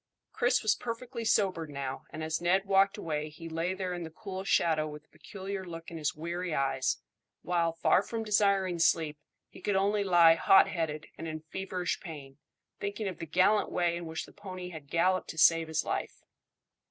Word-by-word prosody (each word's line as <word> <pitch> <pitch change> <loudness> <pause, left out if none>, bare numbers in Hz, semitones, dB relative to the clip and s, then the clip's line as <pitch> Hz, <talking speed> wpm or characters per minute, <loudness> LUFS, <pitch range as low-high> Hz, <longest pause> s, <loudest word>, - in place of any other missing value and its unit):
Chris 245 0 +2
was 215 -1 +4
perfectly 235 +1 -5
sobered 185 -7 +1
now, 140 -2 -5
and 155 - -6
as 160 +1 -2
Ned 185 +3 +2
walked 195 0 +3
away 150 -1 -3
he 160 +2 -10
lay 165 +3 -2
there 185 -1 -3
in 175 - -5
the 165 - -5
cool 190 +3 -7
shadow 160 -5 +2
with 150 0 -9
a - - -40
peculiar 195 -1 -7
look 165 -2 -8
in 165 - -6
his 150 - -1
weary 170 +2 -3
eyes, 135 -1 +1 0.5
while, 170 -2 +1
far 165 +3 +3
from 225 +2 -4
desiring 200 -4 +2
sleep, 155 -2 +2 0.3
he - - -15
could 205 - 0
only 200 +2 +2
lie 175 -4 +7
hot 190 +3 +6
headed 155 -3 -3
and 165 - -5
in 155 0 -5
feverish 185 -2 -2
pain, 145 -5 -10 0.4
thinking 205 +1 -3
of 185 - -5
the 165 - -5
gallant 190 +6 +3
way 175 -1 +1
in 170 -1 -5
which 160 0 -4
the - - -17
pony 185 -3 -7
had 155 -5 -10
galloped 185 +2 +1
to 160 - -7
save 165 0 +5
his 160 0 -1
life. - - -3
175 Hz, 195 wpm, -30 LUFS, 160-195 Hz, 0.5 s, lie